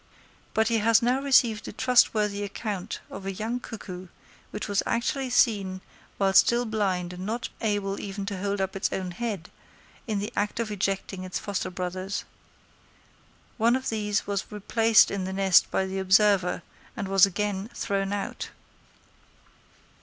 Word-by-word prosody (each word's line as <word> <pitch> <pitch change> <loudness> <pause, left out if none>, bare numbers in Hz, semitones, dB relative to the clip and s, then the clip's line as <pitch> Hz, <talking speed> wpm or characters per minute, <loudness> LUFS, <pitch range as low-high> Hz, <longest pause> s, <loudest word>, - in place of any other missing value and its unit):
But 220 0 +3
he 230 -1 +2
has 225 +2 +4
now 250 +3 +2
received 240 -6 +3
a - - -5
trustworthy 210 -4 +3
account 205 -1 -4
of 195 - -7
a - - -1
young 220 +5 -3
cuckoo 185 -6 -8 0.4
which 210 - -5
was 205 -1 +1
actually 260 +3 -1
seen, 200 -6 +2 0.4
while 195 -1 +2
still 240 +4 +5
blind 190 -5 -1
and 180 +1 -7
not 225 +4 -3
able 205 -2 -1
even 200 0 -5
to 200 -2 -4
hold 200 +1 -1
up 190 0 -2
its 195 - -1
own 185 -1 -3
head, 200 -3 -4 0.6
in 215 -2 -1
the 205 +1 -3
act 210 +2 -1
of 225 -2 -2
ejecting 195 -1 -2
its 185 0 -4
foster 200 -2 -3
brothers. 185 +2 -4 1.3
One 235 +1 +4
of 260 0 -2
these 210 -1 -1
was 200 0 -3
replaced 220 +2 +4
in 195 -2 -2
the 190 - -4
nest 190 -2 +4
by 190 - 0
the 190 0 -3
observer, 190 -1 +3 0.3
and 200 - -3
was 195 0 +6
again 205 +1 -2
thrown 195 -1 -1
out. 205 -1 -4
205 Hz, 160 wpm, -27 LUFS, 190-220 Hz, 1.3 s, was